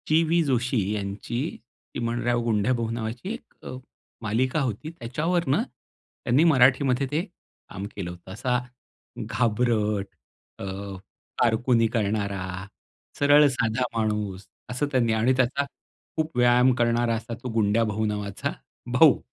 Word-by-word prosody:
चि-वी 165 +2 +3
जोशी 125 -3 0 0.2
यांची 105 +3 -3 0.5
चिमणराव, 120 0 0
गुंड्याभाऊ 115 +1 +1
नावाची 115 - -4
1 235 - -11
अ, - - -6 0.5
मालिका 125 +7 0
होती. 130 +3 -3
त्याच्यावरनं 150 +5 0
त्यांनी 130 +6 -2
मराठीमध्ये 135 -3 +4
ते 155 +3 +1 0.5
काम 95 - -6
केलं 95 -4 -4
होतं 90 +1 -12
असा 125 +5 0 0.7
घाबरट 110 -3 +1 0.6
अ, - - -4 0.8
कारकुनी 115 0 +3
करणारा 100 -4 -2 0.5
सरळ 145 +1 +6
साधा 120 -1 0
माणूस 105 -3 -1 0.2
असं 125 +4 -1
त्यांनी 120 -4 +2
आणि 115 +4 +3
त्याचा 130 +2 +2 0.5
खूप 155 -4 -2
व्यायाम 125 +1 +5
करणारा 120 -1 +2
असा 115 +1 -5
तो 125 - -3
गुंड्याभाऊ 110 0 +1
नावाचा 105 -2 -2 0.4
भाऊ. - - +6
120 Hz, 115 wpm, -25 LUFS, 110-130 Hz, 0.8 s, सरळ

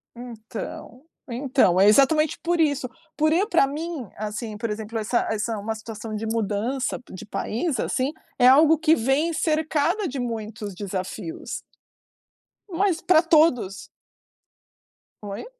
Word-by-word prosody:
Então, 235 +1 -8 0.3
então. 250 -7 +2
É 200 - +6
exatamente 290 +7 +4
por 345 0 +1
isso, 285 -4 +1 0.3
por 310 0 +3
eu 380 +5 +2
pra 340 -9 +4
mim, 300 - -5
assim, 215 +1 -5
por 230 +1 -3
exemplo, 220 +1 -4
essa 220 +3 0
essa 220 +1 -2
uma 215 +2 -3
situação 220 0 -8
de 220 - -4
mudança 225 +4 -1
de 185 - -9
país, 235 +5 -2
assim, 260 +3 0 0.3
é 245 - +6
algo 305 +4 +7
que 320 +1 +4
vem 275 +8 +1
cercada 315 +4 0
de 275 -1 -5
muitos 220 -4 -5
desafios. 190 -2 -5 1.1
Mas 360 -1 0
pra 335 -3 +5
todos. 300 - +2 1.3
Oi? 200 - -6
245 Hz, 130 wpm, -24 LUFS, 215-310 Hz, 1.3 s, algo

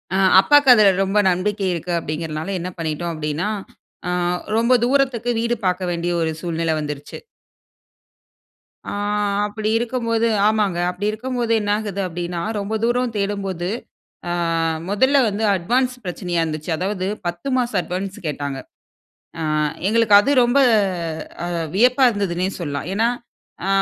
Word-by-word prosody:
ஆ, - - +2 0.2
அப்பாக்கு 290 +3 +5
அதில 215 -4 +6 0.2
ரொம்ப 195 +2 +1
நம்பிக்கை 195 +3 -1
இருக்கு 170 +1 -4
அப்டிங்கிறனால, 155 0 -4
என்ன 175 +1 -4
பண்ணிட்டோ 165 +1 -3
அப்படினா, 155 +4 -2 0.6
ஆ - - 0 0.5
ரொம்ப 235 +2 +3
தூரத்துக்கு 255 -3 +1
வீடு 235 +1 0
பார்க்க 180 0 0
வேண்டிய, 170 0 -2
ஒரு 160 0 0
சூழ்நிலை 165 -2 -1
வந்துருச்சு. 145 -1 -6 1.7
ஆ, - - -3 0.6
அப்படி 215 +1 -3
இருக்கம்போது 230 -1 0 0.2
ஆமாங்க. 210 -5 +1
அப்படி 180 +3 -4
இருக்கம்போது 240 +1 -2
என்ன 205 0 -1
ஆகுது? 205 -2 -4
அப்படினா, 175 0 -4 0.2
ரொம்ப 200 +2 -4
தூர 245 +1 +1
தேடம்போது 195 -3 -2 0.6
அ - - -1 0.6
முதல்ல 260 +8 +3
வந்து 210 +1 -2
அட்வான்ஸ் 250 +8 +1
பிரச்சனையா 175 -1 -2
இருந்துச்சு. 155 +1 -4
அதாவது 190 0 -2 0.2
10 175 +10 -5
மாச 245 -1 0
அட்வான்ஸ் 185 +2 -5
கேட்டாங்க. 145 -2 -3 0.8
ஆ, - - -2 0.5
எங்களுக்கு 225 -1 +3
அது 275 - 0
ரொம்ப, 245 +3 +3 0.9
அ, - - -2 0.3
வியப்பா 250 +6 +4
இருந்ததுனே 185 -4 -1
சொல்லலாம். 145 -2 -4
ஏனா, 225 +3 +2 0.6
ஆ, - - -1
195 Hz, 130 wpm, -21 LUFS, 170-230 Hz, 1.7 s, அதில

